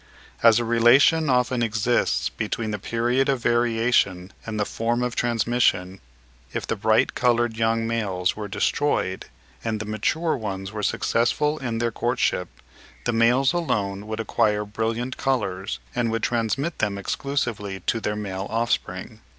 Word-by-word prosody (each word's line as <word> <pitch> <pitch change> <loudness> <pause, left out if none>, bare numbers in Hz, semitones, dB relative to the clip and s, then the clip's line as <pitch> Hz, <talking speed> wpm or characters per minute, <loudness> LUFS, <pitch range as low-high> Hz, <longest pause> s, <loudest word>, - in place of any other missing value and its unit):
As 115 -2 +6
a 120 - 0
relation 125 +7 +5
often 125 -1 +2
exists 105 - +1
between 110 +4 -3
the 105 - -3
period 120 +6 0
of 135 -3 +1
variation 115 -6 +1
and 110 -1 -3
the 105 - +1
form 120 +3 -1
of 125 -1 -2
transmission, 115 -5 +1 0.5
if - - -3
the - - -1
bright - - +2
coloured 120 -2 +2
young 115 0 +1
males 100 -6 -1
were 105 -1 -5
destroyed 95 -2 0 0.4
and 110 -2 -2
the 105 - -4
mature 135 +10 0
ones 100 -4 -5
were 110 -1 -5
successful 135 +8 +1
in 120 -4 -3
their 115 0 0
courtship, 120 -6 0 0.6
the 120 - +1
males 125 +5 +3
alone 105 - -1
would 110 +1 -4
acquire 105 -1 +1
brilliant 115 +4 -3
colours 100 -8 -1 0.2
and 120 -1 0
would 115 0 -2
transmit 120 +7 -1
them 105 -2 0
exclusively 105 -4 -3
to 115 - 0
their 105 -1 -2
male 100 -2 -4
offspring. 115 +1 -2
115 Hz, 150 wpm, -24 LUFS, 105-120 Hz, 0.6 s, As